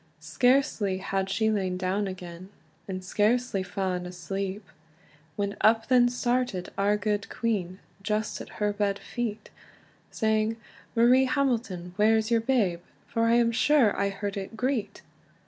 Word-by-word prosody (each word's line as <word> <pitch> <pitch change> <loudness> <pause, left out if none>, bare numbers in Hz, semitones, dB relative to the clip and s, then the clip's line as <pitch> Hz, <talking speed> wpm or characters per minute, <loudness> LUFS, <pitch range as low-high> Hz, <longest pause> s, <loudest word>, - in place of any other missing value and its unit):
Scarcely 210 - +1
had 195 0 -2
she 220 +3 +1
lain 190 -3 -1
down 190 +2 -1
again, 180 -1 -8 0.4
And 185 -1 -5
scarcely 215 +1 +1
faen 185 -2 -3
asleep, 195 +3 -5 0.7
When 200 +1 -2
up 225 +2 +3
then 245 -1 +5
started 245 -6 -1
our 205 +1 +2
gude 205 0 -2
queen, 195 -6 -2 0.2
Just 210 +1 -2
at - - -9
her 210 -1 0
bed 205 -1 0
feet, 225 -2 -5 0.6
Saying 220 0 0 0.4
"Marie 245 +3 +5
Hamilton, 240 -10 -1
where's 220 +1 +3
your 230 -1 +3
babe? 220 -8 +1 0.3
For 230 0 0
I 230 - +3
am 235 -1 +3
sure 265 -2 +3
I 200 0 0
heard 200 0 -4
it 200 +3 -6
greet." 250 -2 -2
210 Hz, 140 wpm, -27 LUFS, 190-230 Hz, 0.7 s, then